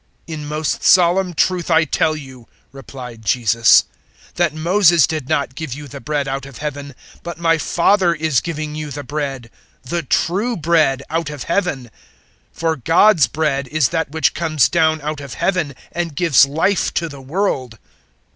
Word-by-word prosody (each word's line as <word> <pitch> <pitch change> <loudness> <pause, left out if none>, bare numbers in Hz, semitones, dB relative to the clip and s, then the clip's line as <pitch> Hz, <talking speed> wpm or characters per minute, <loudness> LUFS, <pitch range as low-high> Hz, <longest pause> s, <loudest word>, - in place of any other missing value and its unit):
006:032 165 - -6
"In 150 -1 -6
most 155 +1 -2
solemn 180 0 +4
truth 180 +1 0
I 160 -1 +4
tell 155 +2 0
you," 130 -5 -11 0.2
replied 125 -4 -10
Jesus, 115 +1 +4 0.5
"that 175 -3 +1
Moses 170 0 +3
did 155 -5 -5
not 140 -2 0
give 145 -3 -6
you 145 0 -9
the 125 - -9
bread 145 +2 -2
out 135 0 -4
of 135 -4 -12
Heaven, 145 -2 -6 0.3
but 170 -2 -7
my 165 -1 +1
Father 175 +2 +2
is 155 -5 0
giving 155 -2 -5
you 155 0 -5
the 145 0 -6
bread 135 -6 -5 0.3
the 170 +7 -3
true 195 - 0
bread 155 -5 +2
out 165 -1 -1
of 145 -3 -7
Heaven. 170 -7 -1
006:033 120 - -15 0.6
For 165 -1 -1
God's 165 - +4
bread 140 0 -1
is 150 0 +1
that 160 -4 -2
which 160 +2 +1
comes 155 -4 +1
down 160 -2 +1
out 150 0 -4
of 140 -3 -8
Heaven 170 -8 -1 0.2
and 170 -3 -4
gives 145 -4 +4
Life 165 +7 0
to 170 - 0
the 140 -3 -10
world." 135 - -2
155 Hz, 175 wpm, -18 LUFS, 140-170 Hz, 0.6 s, solemn